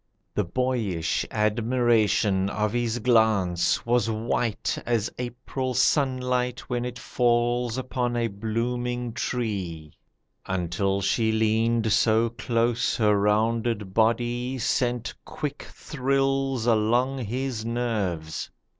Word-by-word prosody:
The - - +1
boyish 105 -6 -1
admiration 110 -3 +2
of 105 0 -1
his 120 -1 0
glance 110 -7 +2
Was 120 -1 +2
white 110 0 -1
as 115 -2 0
April 125 +1 -4
sunlight 125 -3 +1
when 125 -1 -3
it 125 0 -5
falls 120 -1 +1
Upon 125 -1 -2
a 120 - +1
blooming 120 +3 -2
tree, 95 - -3 0.5
until 95 +2 -1
she 110 +3 +1
leaned 110 +1 +2
So 115 +1 +3
close 115 0 0
her 105 -2 +3
rounded 105 0 +1
body 120 +3 +1
sent 120 -1 0
quick 145 -1 -5
thrills 135 -2 -1
Along 120 +4 +2
his 125 0 -3
nerves. 105 -9 -2
115 Hz, 100 wpm, -26 LUFS, 105-125 Hz, 0.5 s, So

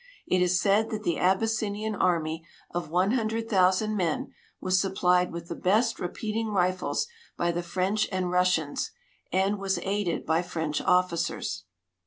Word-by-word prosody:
It 185 - +2
is 180 0 +3
said 210 +2 +3
that 215 -1 -4
the 170 -5 0
Aby.ssinian 215 +2 +1
army 165 -4 0 0.3
of 175 -2 -3
one 180 +5 +2
hundred 225 -2 -1
thousand 195 +1 +3
men 175 -6 -1 0.3
was 185 0 +2
sui>])lied 180 -2 +2
with 170 0 -7
the - - -4
best 220 +7 +1
i*e})eating 220 +5 -2
rifles 185 - 0 0.3
]>y 170 0 +1
the 175 - -1
French 185 +4 0
and 185 -2 -1
Rus 180 0 +4
sians, 150 -3 -3 0.4
and 195 +2 +1
was 195 -1 0
aided 195 -3 -1
by 160 +2 +2
French 160 -4 -2
officers. 180 - 0
185 Hz, 155 wpm, -27 LUFS, 175-210 Hz, 0.4 s, Rus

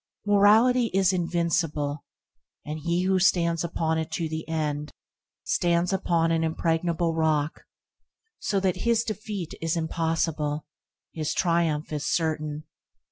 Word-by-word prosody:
Morality 220 +5 +5
is 190 -1 +3
invincible, 165 -4 -1 0.6
and 150 +1 -4
he 170 +3 0
who 190 0 +2
stands 170 -3 +2
upon 160 -1 -1
it 160 +1 -3
to 160 +1 -2
the 160 0 -5
end, 150 -2 -2 0.5
stands 175 +1 +1
upon 170 -3 +1
an 165 0 +1
impregnable 165 +1 0
rock, 155 -2 0 0.7
so 200 - 0
that 190 -2 0
his 235 -1 +2
defeat 210 -5 -5
is 165 +1 0
impossible, 160 -2 -1 0.5
his 155 -1 -2
triumph 165 -3 +1
certain. 155 -2 -1
165 Hz, 120 wpm, -26 LUFS, 155-180 Hz, 0.7 s, Morality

